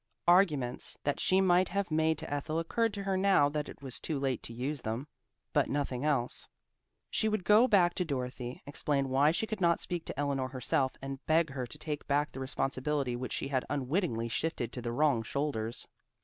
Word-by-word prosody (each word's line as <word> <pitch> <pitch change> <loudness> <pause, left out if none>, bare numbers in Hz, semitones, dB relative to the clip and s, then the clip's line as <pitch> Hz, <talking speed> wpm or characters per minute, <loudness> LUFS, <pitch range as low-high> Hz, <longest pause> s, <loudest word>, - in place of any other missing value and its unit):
Arguments 155 -9 +3
that 145 - 0
she 190 +1 +3
might 185 0 +4
have 200 -3 -1
made 160 0 +2
to 145 - -5
Ethel 155 +2 -2
occurred 225 +7 +1
to 200 - -4
her 195 -1 0
now 190 -7 +4
that 150 0 -3
it - - -12
was 130 -2 -6
too 155 - -2
late 135 -3 -1
to - - -8
use 130 +4 -3
them, 115 +5 -3 0.5
but - - +2
nothing 135 -2 -1
else. 140 -5 0 0.6
She 220 - +2
would 215 -3 -1
go 215 +6 +6
back 180 -6 +4
to 180 - 0
Dorothy, 125 -4 -4
explain 140 -1 0
why 135 +3 +4
she 170 +7 0
could 215 -3 -5
not 170 -1 +4
speak 175 -2 -3
to - - -5
Eleanor 140 -2 0
herself, 130 0 0
and 135 0 -6
beg 160 -1 +3
her 130 -2 -4
to 150 - -9
take 150 -1 -5
back 145 +1 +1
the - - -8
responsibility 135 0 -1
which 125 +1 -4
she 135 - -3
had 130 -2 0
unwittingly 140 - 0
shifted 120 -1 -2
to 125 - -5
the 120 0 -3
wrong 140 -2 +2
shoulders. 115 -2 -2
145 Hz, 205 wpm, -31 LUFS, 130-170 Hz, 0.6 s, go